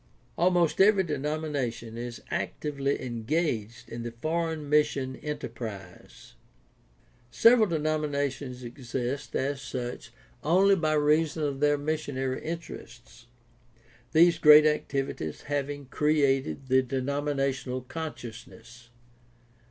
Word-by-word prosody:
— - - -34
Almost 175 -1 +2
every 200 -1 +6
de 155 -4 -2
nomination 140 -6 -3
is 120 0 -6
actively 140 -2 -2
engaged 120 -2 -2
in 115 +1 -6
the 120 - -4
foreign 160 0 -2
mission 140 -3 +1
enter 150 0 -4
prise. 110 -4 -9 1.0
Several 230 - +5
denominations 145 -5 -2
exist 125 +1 -4
as 135 +1 -1
such 125 -1 -5 0.3
only 190 +5 +5
by 155 -4 0
reason 155 +1 +2
of 140 -2 -2
their 145 0 +3
missionary 145 -3 -2
interests, 120 -8 -8 0.8
these 170 +1 +5
great 150 -1 +9
activities 135 - -1
having 145 0 -3
created 140 -1 +1
the 130 0 +4
denominational 135 0 -2
consciousness. 120 -4 -9
140 Hz, 105 wpm, -28 LUFS, 125-155 Hz, 1.0 s, great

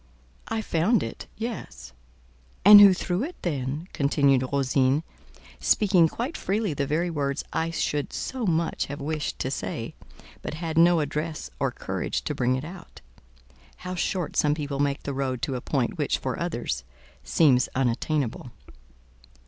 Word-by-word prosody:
"I 225 0 -2
found 190 +8 +2
it: - - -7
yes." 70 - -6 0.7
"And 205 0 +11
who 200 -1 +10
threw 180 +2 -1
it, 340 +5 -5
then?" 145 0 -2
continued 140 -2 +3
Rosine, 135 +1 +2 0.6
speaking 185 -6 +4
quite 245 - -4
freely 200 -2 -1
the 140 -1 -2
very 170 +4 0
words 140 -2 -2
I 165 +1 0
should 150 -3 -2
so 255 -5 -3
much 165 -1 0
have 140 +1 -6
wished 150 +1 -3
to 130 - -2
say, 115 0 -4 0.5
but - - -5
had 165 0 -4
no 170 0 +5
address 150 +2 -4
or - - +1
courage - - -3
to - - -2
bring 125 +1 +1
it 130 +3 -4
out: 175 +1 -11 0.8
how 180 - -3
short 180 -1 -2
some 150 0 +3
people 145 -2 -4
make 140 -1 0
the 140 - -3
road 130 -3 -2
to 130 - -1
a 125 - -4
point - - -1
which, - - +1
for - - -4
others, - - -2 0.4
seems 135 -6 +3
unattainable! 130 0 -1
150 Hz, 155 wpm, -26 LUFS, 135-175 Hz, 0.8 s, And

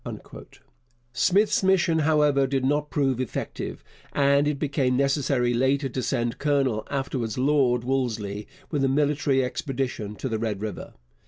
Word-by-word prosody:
Smith's 195 - +3
mission, 185 -4 +3
however, 150 -3 +3
did 135 -1 -1
not 145 +2 0
prove 135 -4 0
effective, 125 - -5 0.3
and 140 0 +3
it 150 -1 0
became 135 -3 0
necessary 135 -3 +1
later 135 +3 +1
to 130 0 -4
send 120 -1 -1
Colonel 135 -7 0
(afterwards 130 -5 -3
Lord) 130 -3 +2
Wolseley 110 -6 -2 0.2
with 145 -4 0
a - - +3
military 140 -1 +2
expedition 125 -5 -3
to 130 - -4
the 110 -3 -2
Red 110 -3 -2
River. 105 0 -6
135 Hz, 140 wpm, -25 LUFS, 125-145 Hz, 0.3 s, Smith's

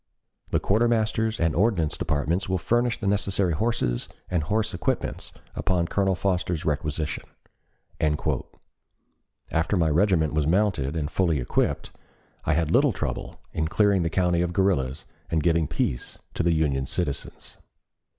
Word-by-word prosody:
The - - +2
Quartermaster's 110 0 +1
and 80 -2 +2
Ordnance 85 -5 +2
Departments 80 +5 -1
will 95 - +1
furnish 120 +5 +1
the 105 - -5
necessary 100 -2 +1
horses 75 - -1 0.2
and 90 -3 +2
horse 105 +7 0
equipments 85 - -2 0.2
upon 90 -2 0
Colonel 95 -2 +1
Foster's 90 -3 -1
requisition." 75 0 -1 2.3
After 85 +5 +1
my 80 -2 +3
regiment 80 -2 +3
was 75 -1 +1
mounted 85 -6 +1
and 75 -1 -2
fully 85 -6 +1
equipped, - - -1 0.5
I 80 - +2
had 80 -1 +1
little - - +4
trouble - - -4
in 80 0 0
clearing 100 +2 +3
the 85 - 0
country 90 0 +2
of 90 0 -1
guerrillas 85 -9 +1 0.2
and 80 -2 +1
giving 80 -2 +2
peace - - -2 0.2
to - - -1
the 85 - +2
Union 70 -5 +1
citizens. 70 -3 -4
85 Hz, 140 wpm, -25 LUFS, 80-100 Hz, 2.3 s, little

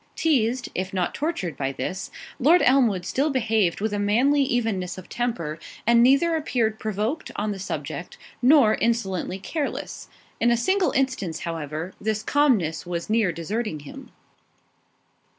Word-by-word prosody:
Teased, 250 -6 +1
if 190 +1 -3
not 180 -2 0
tortured, 285 - -2
by 135 -1 -2
this, 190 +7 -4 0.3
Lord 320 +8 +5
Elmwood 235 -9 +3
still 280 +4 0
behaved 225 - +1
with 215 0 -1
a 205 - -1
manly 245 +8 +3
evenness 225 -9 -1
of 185 - -10
temper, 170 -11 -3 0.3
and 235 +1 +5
neither 275 +7 +4
appeared 235 -8 0
provoked 215 +8 -2
on 210 +1 -1
the 200 - -5
subject, 155 -3 -5 0.2
nor 255 -4 +6
insolently 195 -6 -1
careless. 290 - -4 0.3
In 235 - +3
a 235 - +3
single 375 +8 +2
instance, 260 -11 -1
however, 160 +1 -4
this 215 0 -1
calmness 225 - +2
was 175 +2 -4
near 220 -5 +3
deserting 170 0 -3
him. 145 - -11
220 Hz, 145 wpm, -24 LUFS, 180-260 Hz, 0.3 s, nor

